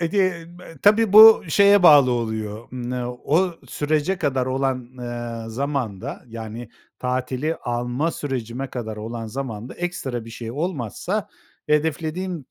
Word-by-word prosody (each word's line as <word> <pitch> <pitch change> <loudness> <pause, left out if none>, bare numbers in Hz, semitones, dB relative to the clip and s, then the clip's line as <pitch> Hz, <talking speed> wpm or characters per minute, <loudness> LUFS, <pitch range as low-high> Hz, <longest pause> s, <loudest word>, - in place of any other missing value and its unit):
E 170 - +1
gen 180 -3 0
me 175 -3 -13
tabii, 210 0 +4
bu 220 +1 +10
şeye 200 +2 +5
bağlı 145 -6 +7
oluyor, 110 -2 -3
ımm, 125 -1 -5 0.3
o 175 +4 +2 0.2
sürece 155 +5 -1
kadar 130 -4 0
olan, 130 -2 -1
eee, 120 -2 -5
zamanda, 130 -6 -4
yani, 115 0 -7 0.3
tatili 130 +4 -2
alma 120 +6 -2
sürecime 130 -3 -4
kadar 110 -3 -5
olan 115 +1 -6
zamanda 120 -1 -6
ekstra 135 -9 -4
bir 115 - -10
şey 115 0 -7
olmazsa 170 - -3 0.4
hedeflediğim 160 +2 -1
130 Hz, 130 wpm, -22 LUFS, 120-165 Hz, 0.4 s, bu